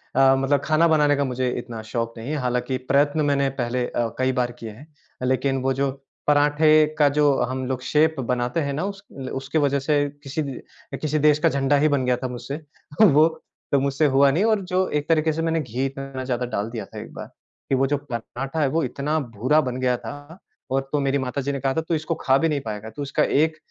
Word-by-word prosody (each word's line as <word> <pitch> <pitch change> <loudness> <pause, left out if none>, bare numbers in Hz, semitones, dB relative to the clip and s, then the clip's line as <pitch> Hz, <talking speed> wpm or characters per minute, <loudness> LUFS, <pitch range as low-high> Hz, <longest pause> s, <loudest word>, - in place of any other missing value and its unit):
अ, 135 0 +6
मतलब 135 +1 +1
ख़ाना 155 +3 +3
बनाने 150 -2 +4
का 140 - 0
मुझे 130 -1 -1
इतना 120 -2 -7
शौक 115 -1 -2
नहीं 115 +5 -6
है। - - -1
हालाँकि 125 0 -1
प्रयत्न 145 +2 +3
मैंने 140 -1 +2
पहले 120 +1 -1
अ, 120 -1 -1
कई 130 0 +2
बार 120 0 -1
किए 115 - -6
हैं 140 +9 -14 0.4
लेक़िन 130 +1 +1
वो 135 0 +1
जो 135 +1 0 0.4
पराँठे 150 +1 +5
का 145 - +6
जो 145 -2 +4
हम 130 +1 -2
लोग 130 -1 -2
शेप 155 +3 +2
बनाते 125 +4 -1
हैं 140 -1 -2
ना 155 +6 -2
उस 200 -1 -5 0.3
उसकी 135 +4 -3
वजह 140 -2 +2
से 145 +1 +1 0.2
किसी 135 +3 -3 0.6
किसी 155 0 0
देश 150 0 +4
का - - +3
झंडा 140 +1 +1
ही 150 +2 +3
बन 130 -2 -1
गया 125 -1 +2
था 130 - -4
मुझसे 125 +3 -6 0.5
वो 155 -5 +7 0.4
तो 140 - +4
मुझसे 140 +3 +1
हुआ 140 0 +6
नहीं 175 +8 +1
और 215 -3 +2
जो 185 0 +2
एक 150 0 -2
तरीक़े 160 -1 +3
से 165 - -2
मैंने 165 -1 0
घी 130 +2 -2
थोड़ा 135 -1 -5
ज्यादा 125 -1 -2
डाल 110 -2 -3
दिया 115 -1 -5
था - - -10
एक - - -11
बार - - -7 0.4
कि 135 - +3
वो 135 +1 +2
जो 145 - +1
पराँठा 135 +6 -4
है 140 - +3
वो 160 +2 0
इतना 140 +5 -1
भुरा 130 +4 +1
बन 125 -2 -3
गया 125 -1 +1
था 145 +9 -10 0.3
और 135 - +2
तो 145 - +1
मेरी 140 0 +1
माता 130 +1 -2
जी 140 +1 -2
ने 140 - -3
कहा 135 0 0
था 160 - 0
तू 165 +1 -3
इसको 155 +2 -2
ख़ा 135 0 +2
भी 165 +2 +1
नहीं 145 -2 0
पाएगा। 105 0 -5
तू 130 +6 -8
इसका 140 - 0
एक 155 +2 +2
140 Hz, 235 wpm, -23 LUFS, 130-150 Hz, 0.6 s, वो